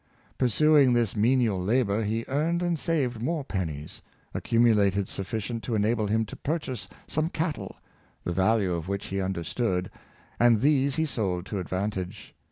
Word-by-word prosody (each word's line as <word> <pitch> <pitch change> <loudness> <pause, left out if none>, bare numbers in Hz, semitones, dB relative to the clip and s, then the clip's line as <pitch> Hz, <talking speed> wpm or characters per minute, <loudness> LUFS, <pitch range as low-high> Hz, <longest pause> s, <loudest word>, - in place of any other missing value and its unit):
Pursuing 140 +1 +5
this 120 -4 +1
menial 110 -3 +2
labor, 105 +1 +1
he 110 +2 -1
earned 165 +6 0
and 170 -3 0
saved 130 -9 -1
more 155 +4 -1
pennies; 80 - -4 0.3
accumulated 105 -5 +3
sufficient 110 +4 -4
to 115 +1 -2
ena 110 +3 +2
ble 110 -2 -1
him 110 +2 +1
to - - -9
purchase 130 - -3 0.2
some 155 +2 -1
cattle, 155 - -3 0.5
the 90 - -2
value 95 0 +2
of 85 0 -3
which 100 +1 -3
he 95 0 -2
understood, 95 +1 -1 0.5
and 120 -3 +5
these 140 -1 +3
he 160 - +1
sold 95 - -2
to 100 - -3
advantage. 95 0 -4
110 Hz, 155 wpm, -27 LUFS, 95-130 Hz, 0.5 s, Pursuing